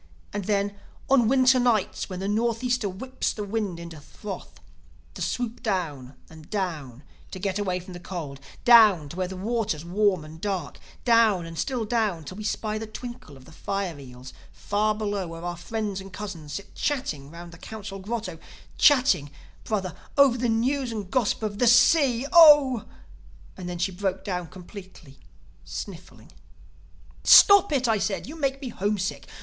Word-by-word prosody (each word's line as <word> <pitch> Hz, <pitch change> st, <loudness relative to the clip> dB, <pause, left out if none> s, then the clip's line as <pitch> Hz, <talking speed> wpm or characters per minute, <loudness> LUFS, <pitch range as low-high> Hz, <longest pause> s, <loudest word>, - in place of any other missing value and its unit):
—And 205 Hz, -2 st, -3 dB
then, 200 Hz, 0 st, 0 dB, 0.4 s
on 250 Hz, -5 st, +5 dB
winter 260 Hz, +1 st, +4 dB
nights 230 Hz, -6 st, 0 dB
when 185 Hz, -1 st, -5 dB
the 195 Hz, -, -2 dB
Northeaster 235 Hz, +1 st, 0 dB
whips 255 Hz, +8 st, -3 dB
the 210 Hz, -, -5 dB
water 200 Hz, -4 st, -3 dB
into 170 Hz, -3 st, -9 dB
froth, 145 Hz, -, -9 dB, 0.5 s
to -, -, -9 dB
swoop 245 Hz, -1 st, -3 dB
down 160 Hz, -, -3 dB
and 160 Hz, -1 st, -15 dB
down 155 Hz, -, -4 dB, 0.3 s
to -, -, -7 dB
get 195 Hz, +1 st, -2 dB
away 185 Hz, -3 st, -1 dB
from 185 Hz, +1 st, -11 dB
the 175 Hz, -, -8 dB
cold, 160 Hz, -7 st, -7 dB, 0.3 s
down 215 Hz, -11 st, +7 dB
to 170 Hz, -, -9 dB
where 185 Hz, 0 st, -2 dB
the 190 Hz, 0 st, -7 dB
water's 210 Hz, -5 st, -2 dB
warm 185 Hz, -2 st, +1 dB
and 160 Hz, +1 st, -12 dB
dark, 190 Hz, -7 st, -3 dB, 0.3 s
down 225 Hz, -7 st, +4 dB
and 165 Hz, 0 st, -8 dB
still 240 Hz, +6 st, -2 dB
down, 210 Hz, -7 st, 0 dB
till 185 Hz, +6 st, -9 dB
we 215 Hz, -, -6 dB
spy 215 Hz, +1 st, -2 dB
the 220 Hz, -, -6 dB
twinkle 240 Hz, -, -9 dB
of 130 Hz, -, -17 dB
the -, -, -15 dB
fire 185 Hz, -1 st, -4 dB
eels 125 Hz, -1 st, -11 dB, 0.2 s
far 215 Hz, +1 st, -1 dB
below 205 Hz, -3 st, -2 dB
where 165 Hz, 0 st, -9 dB
our 175 Hz, 0 st, -3 dB
friends 205 Hz, +2 st, -4 dB
and 195 Hz, 0 st, -11 dB
cousins 185 Hz, -7 st, -7 dB
sit 200 Hz, -, -7 dB
chatting 160 Hz, -, -3 dB
round 170 Hz, +2 st, -10 dB
the 165 Hz, -, -14 dB
Council 205 Hz, -2 st, -8 dB
Grotto—chatting, 210 Hz, -, +1 dB, 0.4 s
Brother, 190 Hz, -5 st, -2 dB, 0.2 s
over 280 Hz, -3 st, +6 dB
the 245 Hz, -1 st, -1 dB
news 250 Hz, +3 st, 0 dB
and 205 Hz, -4 st, -6 dB
gossip 235 Hz, -3 st, 0 dB
of 205 Hz, -1 st, -3 dB
the 245 Hz, -, +3 dB
Sea!... 255 Hz, 0 st, +5 dB
Oh—' 295 Hz, -8 st, +7 dB, 0.7 s
"And 180 Hz, -2 st, -7 dB
then 175 Hz, -, -4 dB
she 180 Hz, +3 st, -1 dB
broke 190 Hz, 0 st, -3 dB
down 180 Hz, -3 st, -3 dB
completely, 185 Hz, -5 st, -13 dB, 0.4 s
sniffling. 115 Hz, -, -9 dB, 0.9 s
"'Stop 400 Hz, -3 st, +8 dB
it!' 265 Hz, -4 st, +1 dB
I 220 Hz, -2 st, +2 dB
said. 195 Hz, 0 st, -2 dB
'You 300 Hz, -, -9 dB
make 275 Hz, -3 st, -1 dB
me 255 Hz, -, -4 dB
homesick. 205 Hz, -2 st, -2 dB
200 Hz, 170 wpm, -25 LUFS, 175-230 Hz, 0.9 s, Stop